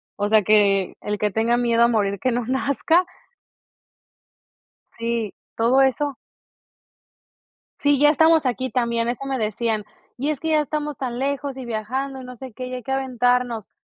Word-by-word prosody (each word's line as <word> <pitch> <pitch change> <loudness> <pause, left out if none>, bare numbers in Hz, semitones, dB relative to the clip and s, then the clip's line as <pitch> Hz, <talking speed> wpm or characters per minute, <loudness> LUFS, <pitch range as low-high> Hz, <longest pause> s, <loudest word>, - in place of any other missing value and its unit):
o 205 0 -1
sea, 220 0 +5
que 200 -2 +3
el 210 0 -3
que 210 0 0
tenga 225 +4 +1
miedo 235 -1 +3
a 235 - +5
morir 200 -4 +1
que 255 - +1
no 240 0 -1
nazca. 280 +7 +1 1.9
Sí, 230 -2 -2 0.2
todo 235 +4 +3
eso. 270 +2 +1 1.6
Sí, 285 -1 +3
ya 295 +1 +6
estamos 320 +1 +4
aquí 255 +1 -1
también, 235 -1 0
eso 245 +3 -4
me 270 -1 -2
decían, 220 -1 -1 0.3
y 275 +4 -1
es 300 -3 -2
que 320 - -3
ya 305 -1 +4
estamos 300 -1 -3
tan 245 -2 -4
lejos 280 0 -2
y 260 - -6
viajando 260 +4 -3
y - - -10
no 250 0 -9
sé 255 0 -10
qué, 255 +3 -6
y 255 - -7
hay 250 - -7
que 265 - -5
aventarnos. 250 -4 0
250 Hz, 175 wpm, -22 LUFS, 225-270 Hz, 1.9 s, ya